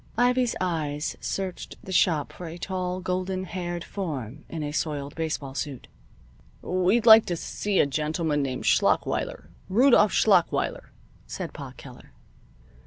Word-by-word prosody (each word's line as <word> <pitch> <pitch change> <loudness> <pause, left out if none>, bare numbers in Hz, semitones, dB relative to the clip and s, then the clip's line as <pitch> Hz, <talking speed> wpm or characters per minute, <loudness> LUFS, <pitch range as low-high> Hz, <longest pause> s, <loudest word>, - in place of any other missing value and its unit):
Ivy's 245 0 +2
eyes 155 -4 -2
searched 190 -2 -4
the 190 - -8
shop 165 -5 +2
for 175 - -8
a 165 +1 -7
tall, 185 0 -3
golden 185 +1 -2
haired 175 -1 -4
form 150 - -5
in 160 -2 -4
a 145 - -3
soiled 150 -2 -3
baseball 155 -4 -3
suit. 135 0 -5 0.8
"We'd 185 +6 +2
like 220 -1 +9
to 175 - -1
see 200 +4 -2
a - - +5
gentleman 150 +2 -1
named 130 -2 -3
Schlachweiler - - +1 0.2
Rudolph 225 0 +5
Schlachweiler," 190 -6 +2 0.4
said - - -6
Pa - - -8
Keller. - - -13
175 Hz, 135 wpm, -26 LUFS, 150-190 Hz, 0.8 s, like